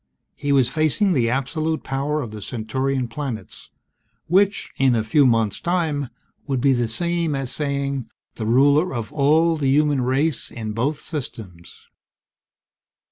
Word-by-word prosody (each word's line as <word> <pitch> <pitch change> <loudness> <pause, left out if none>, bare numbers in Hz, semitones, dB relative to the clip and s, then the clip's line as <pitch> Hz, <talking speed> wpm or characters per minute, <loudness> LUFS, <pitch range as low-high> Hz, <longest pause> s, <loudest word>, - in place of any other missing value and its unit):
He 145 - -2
was 135 -3 +4
facing 155 +8 +1
the 120 -6 +2
absolute 155 +5 -1
power 140 +3 -2
of 115 - -7
the 105 -1 -8
Centaurian 130 +4 -2
planets 120 -2 -6 0.6
which, 195 +4 +2
in 130 -2 +4
a 110 - +1
few 135 +5 +4
months' 115 -4 +1
time, 160 -6 -1 0.4
would 135 -3 0
be 135 +2 +3
the 120 -2 0
same 170 +5 -1
as 135 -2 -3
saying 140 -4 -2 0.2
the 110 - -4
ruler 140 +6 +3
of 115 -3 -5
all 160 +3 +3
the 140 -3 0
human 145 -1 +3
race 135 +5 0
in 110 -2 -5
both 140 +7 -1
systems. 110 - -8
135 Hz, 145 wpm, -22 LUFS, 120-150 Hz, 0.6 s, was